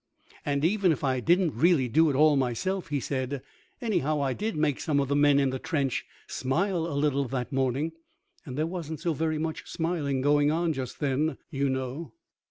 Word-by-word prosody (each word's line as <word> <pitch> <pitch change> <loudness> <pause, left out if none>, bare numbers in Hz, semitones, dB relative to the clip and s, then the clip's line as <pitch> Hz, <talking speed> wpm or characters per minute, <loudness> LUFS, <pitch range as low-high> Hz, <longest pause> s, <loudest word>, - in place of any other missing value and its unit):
"And 140 +1 0
even 190 0 +3
if 150 - -2
I 130 -2 +1
didn't 175 +4 +3
really 140 +1 +3
do 160 +6 +4
it 140 - 0
all 150 +1 +5
myself," 140 +9 -1
he 145 -3 -1
said, 130 0 -3 0.4
"anyhow 155 - 0
I 135 -2 0
did 215 - -3
make 150 -3 +1
some 145 -2 +1
of 140 -1 0
the 140 - +2
men 145 -1 +5
in 135 -2 +2
the 130 - -3
trench 140 -6 -1 0.2
smile 170 +6 -1
a 145 -4 -3
little 140 -1 +1
that 125 +1 -3
morning, 135 +4 0 0.5
and 130 -3 -7
there 155 - +1
wasn't 165 -3 -5
so 170 - 0
very 155 +1 -1
much 160 +1 -4
smiling 155 -5 -1
going 145 +1 +4
on 165 +1 +1
just 130 -3 -6
then, 145 +3 0
you 140 -1 0
know." 130 +1 -4
145 Hz, 195 wpm, -28 LUFS, 135-160 Hz, 0.5 s, all